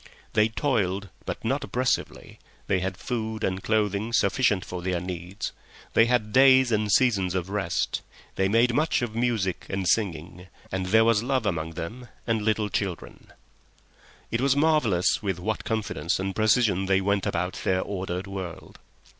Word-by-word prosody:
They 105 0 +4
toiled, 100 -7 -1 0.2
but - - -5
not 135 +5 0
oppressively; 125 +1 -2 0.3
they 95 - +1
had 95 0 -3
food 110 +1 -4
and 95 0 -1
clothing 105 +1 0
sufficient 100 -1 +2
for 90 -1 -6
their 90 -1 -1
needs; 90 +2 -5 0.4
they 115 - +5
had 115 -4 0
days 130 -1 +6
and 105 -1 +1
seasons 100 -6 +3
of 95 +1 -2
rest; 100 -4 -1 0.3
they 95 - +1
made 115 +4 +3
much 150 -1 +1
of 115 -3 -3
music 115 -6 -1
and 95 -1 -2
singing, 90 -3 -1 0.2
and 95 0 -2
there 110 +4 +5
was 115 -2 +3
love 130 -1 0
among 80 -4 -2
them 105 +10 -7 0.2
and 115 -2 0
little 105 0 0
children. 95 -4 -4 1.0
It 115 - 0
was 135 0 +3
marvellous 140 - +2
with 95 -4 -2
what 105 +4 -2
confidence 105 -8 -1
and 95 0 -3
precision 110 -3 +2
they 95 0 +3
went 100 0 0
about 90 +2 -2
their 95 0 +1
ordered 95 -1 -4
world. 95 -3 -7
100 Hz, 160 wpm, -26 LUFS, 95-115 Hz, 1.0 s, days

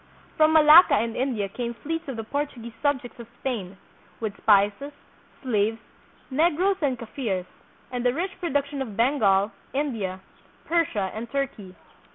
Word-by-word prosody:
From 310 0 +4
Malacca 315 +3 +8
and 230 +2 -1
India 245 -6 -1
came 235 +4 -5
fleets 325 +5 -4
of 270 - -4
the 225 - -4
Portuguese 240 -2 -4
subjects 265 -5 -1
of 235 - -9
Spain, 200 -8 -4 0.4
with 220 -3 -3
spices, 205 +7 +2 0.5
slaves, 220 -3 +1 0.5
Negroes 345 +7 +2
and 270 -4 +1
Kafirs, 220 -5 -3 0.5
and 245 -1 -3
the 245 - +3
rich 350 +8 -2
productions 285 -4 -1
of 220 -7 -6
Bengal, 220 -5 +3 0.2
India, 225 -10 -2 0.5
Persia, 290 - 0
and 225 +2 -6
Turkey. 225 -9 -4
245 Hz, 140 wpm, -25 LUFS, 215-290 Hz, 0.5 s, Malacca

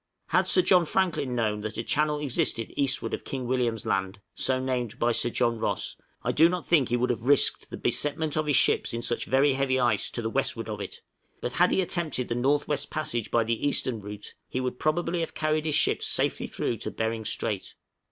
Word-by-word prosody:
Had - - +2
Sir 365 - +4
John 180 - +5
Franklin 160 -8 0
known 105 -3 0
that 110 0 -5
a 115 - -2
channel 150 +4 +1
existed 130 -5 0
eastward 135 -2 0
of - - -3
King 130 -2 -4
William's 120 -3 -1
Land 95 +1 -1
(so 130 -1 0
named 125 -3 -2
by 120 -1 +2
Sir 120 - 0
John 120 -1 0
Ross), - - -2 0.3
I - - +1
do 165 +2 +5
not 180 -1 -3
think 150 -7 +3
he 120 - +1
would 125 +1 +1
have 120 +1 -4
risked 145 -1 +3
the - - -6
besetment 150 +1 0
of 155 -1 0
his 145 - +3
ships - - +3
in 115 - -4
such 120 - -1
very 135 +2 +3
heavy 130 -1 +1
ice 120 -5 +1
to 120 - -4
the 110 - -1
westward 120 -4 -1
of 105 -1 -4
it; - - -8 0.4
but 120 - -4
had 180 +6 +4
he - - +2
attempted 160 -8 -1
the - - 0
north 135 +5 +1
west 145 -1 0
passage 120 -8 -2
by 115 - +2
the 115 +5 -1
eastern 130 -4 0
route, 105 0 -8 0.2
he 130 - -2
would 125 -1 -3
probably 170 +2 0
have 165 - -4
carried 155 0 0
his 150 - +2
ships - - +2
safely - - +1
through - - -2
to - - -4
Behring 110 0 -2
Strait. - - -2
130 Hz, 220 wpm, -27 LUFS, 115-150 Hz, 0.4 s, John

